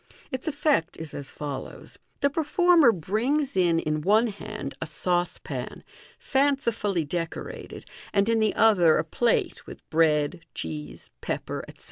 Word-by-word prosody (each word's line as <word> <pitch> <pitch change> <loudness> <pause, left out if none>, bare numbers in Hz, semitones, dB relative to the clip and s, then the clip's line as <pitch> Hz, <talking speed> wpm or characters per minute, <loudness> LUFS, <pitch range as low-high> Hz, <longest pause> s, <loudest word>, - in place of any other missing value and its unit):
Its 260 +4 -4
effect 285 - +1
is 160 -2 -6
as 140 -1 -6
follows: 140 -3 -7
— - - -43
The 280 0 +3
pei 320 +3 0
former 345 -4 +5
brings 245 - -1
in 175 -3 +3
in 155 -1 -1
one 215 +7 +3
hand 205 -8 -6
a 160 - -2
sauce 175 +3 0
pan, - - -6 0.3
fancifully 235 - +1
decorated, 165 +2 -5 0.3
and 200 0 +2
in 230 -1 +3
the 215 -1 +1
other 185 -8 +5
a - - +1
plate, 230 +9 0
with - - -11
bread, 155 +1 +2
cheese, 75 -2 -6
pepper, - - -4
etc. - - -14
195 Hz, 150 wpm, -26 LUFS, 160-250 Hz, 0.3 s, former